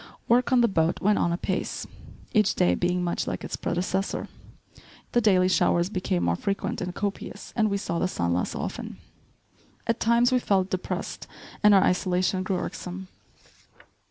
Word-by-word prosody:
Work 245 +3 +3
on 255 -2 +5
the 235 - +5
boat 165 -5 +1
went 210 +1 +2
on 170 - +1
apace, 185 +2 -2 0.5
each 215 -4 +3
day 90 - +3
being 180 - 0
much 175 -1 -1
like - - -3
its - - -4
predecessor. 185 +2 -2 0.8
The 240 - +3
daily 185 -4 +4
showers 175 0 +2
became 180 - -1
more 85 0 +2
frequent 200 - -2
and 180 0 -4
copious 200 -1 -5
and 215 -2 +2
we 200 - 0
saw 170 -3 -2
the - - +1
sun 85 - -1
less 90 - -1
often. - - -5 0.9
At 230 0 0
times 235 +2 +3
we 255 - +3
felt 190 -5 +1
depressed 185 - -4 0.3
and 210 -1 +7
our 195 - +6
isolation 185 0 +1
grew 185 0 -1
irksome. 185 +1 -6
185 Hz, 165 wpm, -26 LUFS, 180-210 Hz, 0.9 s, and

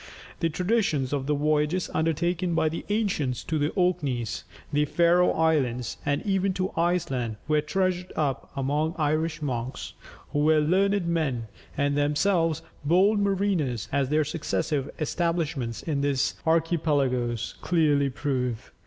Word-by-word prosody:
The 165 - +1
traditions 170 - 0
of 135 -2 -2
the 150 - +2
voyages 150 +4 +1
undertaken 170 +2 0
by 160 - +2
the 165 - -5
ancients 195 - 0
to 160 -2 -1
the 145 +1 +1
Orkneys, 145 - 0 0.3
the 150 0 +2
Faröe 175 +3 +3
Islands, 135 -7 +1
and 145 0 -1
even 195 -1 +1
to 185 +1 -1
Iceland, 165 -10 0
were 150 0 +3
treasured 185 +2 -1
up 145 -4 -1
among 145 +4 0
the 180 - -15
Irish 155 +1 0
monks, 125 -2 -4 0.4
who 145 - 0
were 155 +1 +4
learned 190 +5 +2
men, 145 -10 -1 0.3
and 140 0 +1
themselves 155 +3 +1 0.2
bold 190 +8 +4
mariners, 190 - 0
as 140 -2 +1
their 155 +1 +3
successive 150 -2 -2
establishments 155 -7 -1
in 145 -4 -1
these 140 -1 +1
archipelagos 145 -8 +1
clearly 150 -5 +2
prove. 125 -4 -2
155 Hz, 135 wpm, -26 LUFS, 140-175 Hz, 0.4 s, were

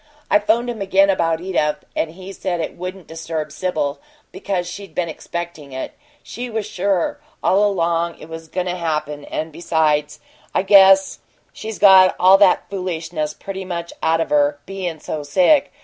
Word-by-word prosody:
I 310 - +6
'phoned 235 -3 +1
him 235 -4 -5
again 195 0 +4
about 165 -3 0
Edith, 155 -5 -1
and 160 - 0
he 190 +2 -10
said 180 -2 -3
it 160 - -4
wouldn't 185 0 -7
disturb 160 -2 -5
Sibyl, 155 -4 -2 0.3
because 185 -3 -3
she'd 200 +2 -9
been 175 -2 -1
expectin' 165 -3 -7
it; 130 - -5 0.3
she 245 +1 -6
was 220 -2 -3
sure 195 - -1 0.2
all 195 +2 +3
along 170 -4 0
it - - -12
was 165 0 -9
goin' 180 +3 -3
to 180 0 -2
happen; 150 -4 -3
and, 160 +1 -4
besides, 155 -2 0 0.4
I - - +2
guess 195 -1 +6 0.3
she's 220 -1 -7
got 190 -2 +7
all 190 +2 +7
that 200 -3 +4
foolishness 165 -5 -4
pretty 195 -1 -6
much 170 -2 -5
out 165 0 +2
of - - -3
her, 145 0 +3
bein' 185 -4 -5
so 150 0 -5
sick. 185 - +3
175 Hz, 170 wpm, -20 LUFS, 160-195 Hz, 0.4 s, got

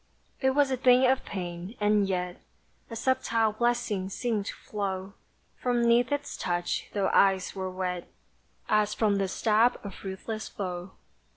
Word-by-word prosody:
It 265 -1 +2
was 285 -2 +3
a 260 - +1
thing 250 +1 +5
of 260 +1 +3
pain, 180 +2 -5
and 210 -1 +3
yet 180 -1 -2 0.5
A 230 - -6
subtile 230 -2 +1
blessing 215 -4 0
seemed 215 -1 -2
to - - -4
flow 195 -2 -4 0.4
From 245 -1 +1
'neath 235 +1 +4
its 285 0 -2
touch, 175 -1 -2
though 200 -2 +1
eyes 195 -1 +3
were 190 -1 -3
wet 180 -1 -4 0.6
As 210 0 +2
from 210 -3 +2
the 195 -1 +1
stab 220 +5 +2
of 200 -2 -9
ruthless 210 +3 -5
foe! 180 -1 -5
205 Hz, 155 wpm, -28 LUFS, 190-235 Hz, 0.6 s, thing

